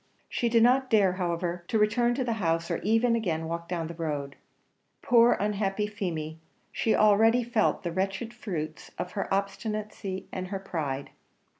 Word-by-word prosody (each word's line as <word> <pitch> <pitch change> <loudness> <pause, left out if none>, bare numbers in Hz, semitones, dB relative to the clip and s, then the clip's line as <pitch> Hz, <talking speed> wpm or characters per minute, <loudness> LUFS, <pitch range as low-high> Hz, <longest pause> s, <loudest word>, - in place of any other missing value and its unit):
She 240 - 0
did 230 -1 +4
not 255 +2 +4
dare, 200 -4 +4
however, 175 -1 -2
to 225 - +1
return 240 +3 +2
to 260 - 0
the 240 -2 0
house, 165 -1 0
or - - 0
even 225 +3 +2
again 175 -8 -1
to - - -5
walk 170 +1 -5
down 170 -2 -2
the 165 - -6
road. 145 -4 -3 0.7
Poor, 235 0 +6
unhappy 205 0 0
Feemy! 165 -7 -4 0.3
she 225 - +1
already 225 +3 +5
felt 230 -3 +1
the 170 - -2
wretched 195 +6 -2
fruits 165 -10 -5
of 180 - -4
her 195 - -4
obstinacy 200 0 -3
and 185 0 -4
her 195 +1 -3
pride. 150 -8 -4
195 Hz, 170 wpm, -28 LUFS, 170-225 Hz, 0.7 s, Poor